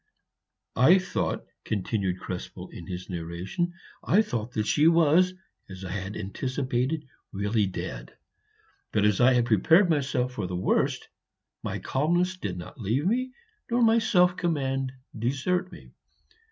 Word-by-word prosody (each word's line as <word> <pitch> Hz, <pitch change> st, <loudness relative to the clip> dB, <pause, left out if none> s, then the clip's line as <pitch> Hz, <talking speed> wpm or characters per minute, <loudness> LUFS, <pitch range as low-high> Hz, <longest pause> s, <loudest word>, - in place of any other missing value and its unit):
"I 150 Hz, +10 st, +7 dB
thought," 185 Hz, -1 st, -2 dB, 0.2 s
continued 95 Hz, -2 st, -1 dB
Krespel 90 Hz, 0 st, -7 dB
in 85 Hz, -, -9 dB
his 90 Hz, 0 st, -6 dB
narration, 90 Hz, -, -3 dB, 0.3 s
"I 210 Hz, +4 st, +4 dB
thought 120 Hz, -, -4 dB
that 105 Hz, -2 st, -1 dB
she 150 Hz, +8 st, +4 dB
was, 170 Hz, +2 st, +4 dB, 0.3 s
as 95 Hz, 0 st, -8 dB
I 90 Hz, -, -5 dB
had 95 Hz, +1 st, -4 dB
anticipated, 130 Hz, +7 st, -2 dB, 0.3 s
really 105 Hz, +1 st, 0 dB
dead; 95 Hz, -, -6 dB, 0.7 s
but 105 Hz, -1 st, +2 dB
as 105 Hz, 0 st, +3 dB
I 130 Hz, +2 st, +6 dB
had 120 Hz, -1 st, +3 dB
prepared 160 Hz, -, +4 dB
myself 130 Hz, -4 st, 0 dB
for 105 Hz, -7 st, -3 dB
the 90 Hz, -, -4 dB
worst, 90 Hz, -, 0 dB, 0.5 s
my -, -, -3 dB
calmness 175 Hz, +6 st, 0 dB
did 100 Hz, -, -4 dB
not 105 Hz, +9 st, -9 dB
leave 115 Hz, -, 0 dB
me, 255 Hz, +6 st, 0 dB, 0.4 s
nor 240 Hz, +1 st, +2 dB
my 225 Hz, 0 st, +5 dB
self 180 Hz, -5 st, +3 dB
command 135 Hz, -7 st, -1 dB, 0.2 s
desert 140 Hz, -, -1 dB
me. -, -, -13 dB
130 Hz, 140 wpm, -27 LUFS, -, 0.7 s, I